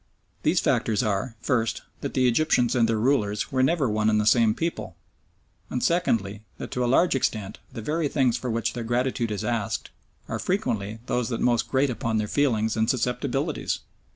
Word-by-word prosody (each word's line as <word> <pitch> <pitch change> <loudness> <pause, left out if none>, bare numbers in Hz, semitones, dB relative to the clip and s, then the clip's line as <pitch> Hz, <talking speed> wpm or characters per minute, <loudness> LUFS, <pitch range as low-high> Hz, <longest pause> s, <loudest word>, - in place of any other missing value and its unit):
These - - +2
factors 110 +2 +1
are 105 +2 -1
first, 115 -5 0 0.2
that - - -5
the 130 -1 +4
Egyptians 125 -2 +2
and 115 -3 +3
their 115 - +1
rulers 105 -4 +1
were 130 - +1
never 145 +1 +2
one 110 0 +1
and 105 0 +3
the 105 - +1
same 110 0 +4
people, 165 +4 -3 0.7
and 125 - -2
secondly, 115 - +1 0.2
that - - -7
to 125 - -1
a - - +1
large 170 +8 +4
extent 110 -6 -1
the 115 -4 -7
very 155 +4 0
things 130 -4 +2
for 125 0 -3
which 115 0 -1
their 120 - -4
gratitude 120 0 0
is 105 -3 -3
asked 110 -4 -2 0.4
are - - -3
frequently 110 - -1
those 125 -1 -1
that 115 - -2
most 120 -1 +1
grate 135 0 +2
upon 115 -1 -1
their 105 -1 0
feelings 110 -5 +1
and 110 +1 +1
susceptibilities. 125 -1 -1
120 Hz, 185 wpm, -25 LUFS, 110-130 Hz, 0.7 s, the